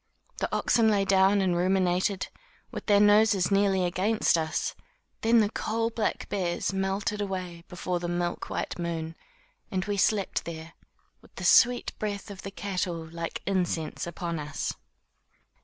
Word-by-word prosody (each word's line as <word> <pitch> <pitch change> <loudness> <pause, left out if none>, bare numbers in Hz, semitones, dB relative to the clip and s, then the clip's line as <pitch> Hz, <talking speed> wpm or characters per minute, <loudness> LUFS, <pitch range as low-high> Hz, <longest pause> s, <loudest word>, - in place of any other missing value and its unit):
The - - -1
oxen 225 -2 +3
lay 200 -2 +2
down 195 +1 +4
and 185 -2 +1
ruminated, 185 +1 +1 0.4
with - - -7
their 205 -2 +5
noses 205 -2 +4
nearly 195 -2 +3
against 190 +5 +2
us. 160 -1 -1 0.5
Then 230 0 +5
the 210 0 +1
coal 225 +1 -1
black 220 -2 -2
bears 180 -1 -1
melted 195 +2 -1
away 180 -4 -4
before 180 0 -3
the 175 - -4
milk 175 0 -2
white - - -3
moon, 165 -1 -3 0.5
and 185 -1 -2
we 205 0 -2
slept 200 0 +1
there, 165 -1 -7 0.5
with - - -22
the - - -7
sweet 245 0 +5
breath 205 -1 -4
of 195 -1 -9
the 195 - -6
cattle, 185 -4 -3
like 170 0 -5
incense, 175 -5 -1
upon 170 -1 -4
us. 150 -1 -3
190 Hz, 150 wpm, -28 LUFS, 175-205 Hz, 0.5 s, their